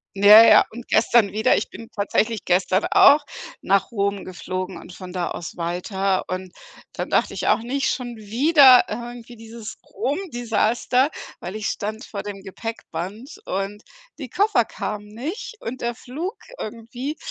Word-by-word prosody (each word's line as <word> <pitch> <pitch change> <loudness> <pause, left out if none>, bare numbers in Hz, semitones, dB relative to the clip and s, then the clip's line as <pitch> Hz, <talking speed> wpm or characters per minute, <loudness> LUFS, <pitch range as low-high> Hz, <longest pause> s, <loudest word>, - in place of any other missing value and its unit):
Ja, 205 +3 +9
ja, - - +8
und 240 +2 -10
gestern 225 -2 +3
wieder. 220 +4 +2
Ich 210 - -3
bin 230 - -10
tatsächlich 215 +1 -1
gestern 185 +2 +2
auch 290 0 +6 0.4
nach 195 +2 +1
Rom 200 -2 -1
geflogen 185 0 -5
und 175 - -12
von 185 -1 -9
da 180 -1 -3
aus 175 - -7
weiter, 185 +3 -1
und 185 0 -5 0.4
dann - - -4
dachte - - +1
ich - - -3
auch: - - +5
„Nicht 270 +4 -1
schon 245 -2 -5
wieder 255 +5 +6
irgendwie 240 +2 -7
dieses 225 -1 -10
Rom-Desaster”, 250 - 0 0.3
weil 180 +4 -7
ich 215 -2 -3
stand 215 +3 -4
vor 200 - -6
dem 200 -1 -8
Gepäckband 205 +1 -7
und 195 +2 -3 0.4
die 260 -5 -7
Koffer 400 - +2
kamen 210 0 -5
nicht 280 - -6
und 255 +3 -6
der 235 0 -2
Flug 315 - -6 0.2
irgendwie, 240 +7 -6
220 Hz, 155 wpm, -22 LUFS, 195-245 Hz, 0.4 s, Ja